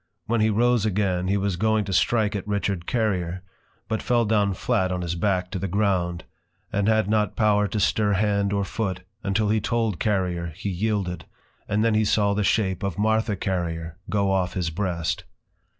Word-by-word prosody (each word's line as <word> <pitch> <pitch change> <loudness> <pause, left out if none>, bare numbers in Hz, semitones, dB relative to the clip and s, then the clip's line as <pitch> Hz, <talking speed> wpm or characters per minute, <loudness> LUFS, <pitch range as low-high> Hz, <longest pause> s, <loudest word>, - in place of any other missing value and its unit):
When 115 -1 +1
he 110 - +4
Rose 120 +1 +2
again, 95 -4 0
he 100 +2 +2
was 100 -2 -1
going 110 +1 +2
to 95 - -3
strike 105 +2 +2
at 100 0 -4
Richard 100 -4 -1
Carrier; 95 -6 -1 0.4
but 110 -2 -2
fell 120 -2 +2
down 105 -2 +2
flat 95 0 0
on 90 -1 -2
his 85 -1 -2
Back 90 0 0
to 95 - -3
the 100 - -2
ground, 90 -3 0 0.5
and 100 0 +1
had 110 -2 +3
not 105 0 +1
power 105 -2 +3
to 105 +2 -2
stir 105 +1 +2
hand 100 0 +1
or 100 0 +1
foot, 95 -2 -3 0.2
until 105 0 0
he 110 0 +2
told 115 -4 0
Carrier 90 -5 -1
he 100 +2 -4
yielded; 95 -3 -2 0.4
and 105 +2 +1
then 115 - +3
he 110 0 +3
saw 100 -1 +2
the 105 +1 0
shape 100 -2 +1
of 100 -4 -3
Martha 110 0 +1
Carrier, 85 -3 -3
go 100 -2 +1
off 95 -2 0
his 90 -4 -1
breast. 85 -2 -2
100 Hz, 190 wpm, -24 LUFS, 90-110 Hz, 0.5 s, he